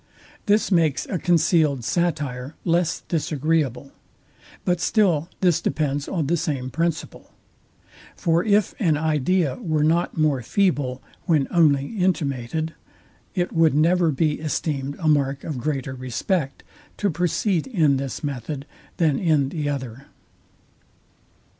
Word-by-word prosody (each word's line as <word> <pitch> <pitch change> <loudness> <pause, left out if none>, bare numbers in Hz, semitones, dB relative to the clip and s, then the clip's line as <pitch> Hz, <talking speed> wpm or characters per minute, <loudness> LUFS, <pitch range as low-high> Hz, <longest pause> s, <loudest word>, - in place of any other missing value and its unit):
This 210 +1 +2
makes 160 -7 +2
a 185 - -3
concealed 160 -6 +2
satire 145 -4 -2
less 170 0 +1
disagreeable; 150 -4 -1 0.7
but 180 -1 +1
still 175 -7 +2
this 180 -4 +3
depends 145 -2 -1
on 170 -6 -1
the 170 +5 +1
same 140 -6 -3
principle. 165 +3 -3 0.9
For 170 -1 +1
if 210 -1 +2
an 165 -9 +2
idea 155 +1 +1
were 155 -10 0
not 165 +3 +1
more 150 -4 +2
feeble, 140 - 0 0.2
when 150 -5 +3
only 145 -5 +4
intimated, 160 -4 -1 0.6
it 175 -2 -1
would 165 -3 +3
never 170 +2 +3
be 150 +1 0
esteemed 145 -2 -2
a 160 - -2
mark 140 -2 +2
of 150 -6 -4
greater 135 -1 -2
respect 130 +4 -2 0.3
to 200 -2 0
proceed 175 +2 0
in 160 - +2
this 135 +2 -5
method 140 0 -4 0.3
than 155 -5 +2
in 155 -6 +2
the 150 -1 -2
other. 130 -2 -5
155 Hz, 125 wpm, -23 LUFS, 140-170 Hz, 0.9 s, only